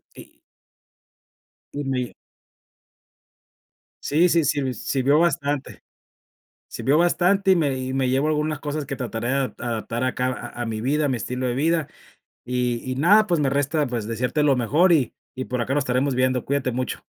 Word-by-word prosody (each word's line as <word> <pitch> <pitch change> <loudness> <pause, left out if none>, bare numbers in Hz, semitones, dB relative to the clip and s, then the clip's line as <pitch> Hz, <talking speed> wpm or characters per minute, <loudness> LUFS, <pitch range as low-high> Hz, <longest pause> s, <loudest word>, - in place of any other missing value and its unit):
Y - - -15 1.3
Y 145 0 -3
me 130 -2 -2 1.9
Sí, 170 +5 +3
sí, 165 -3 +3
sí 145 +1 +1
me 130 -1 -2
sirvió 140 +4 +1
bastante, 145 -4 -1 0.9
sirvió 130 +6 0
bastante, 180 +3 +3
y 185 - +6
me 145 -5 +1
y 130 0 -4
me 135 -1 0
llevo 135 +4 +1
algunas 155 0 -1
cosas 150 -1 -4
que - - -4
trataré 120 -2 -4
de 135 - +1
adap 135 -2 -2
adaptar 120 0 -3
acá 125 0 -1
a 120 -1 -5
a - - -3
mi 110 -1 -3
vida, 145 +5 +1
a - - +1
mi 125 -3 -1
estilo 125 +2 -3
de 120 - -1
vida. 160 +2 +1 0.6
Y 125 -1 -1
y 130 - -2
nada, 205 +9 +5
pues, 170 -3 +1
me 135 - +2
resta, 145 +2 0
pues, 115 -3 -3
desearte 125 +6 -1
lo 145 -2 +4
mejor 155 +9 +3
y 135 -7 +1 0.2
y 130 0 -4
por 125 -1 -3
acá 130 - -1
nos 145 - +2
estaremos 130 +1 0
viendo, 130 -1 +1
cuídate 140 -2 0
mucho. 130 +2 -4
135 Hz, 180 wpm, -23 LUFS, 125-150 Hz, 1.9 s, y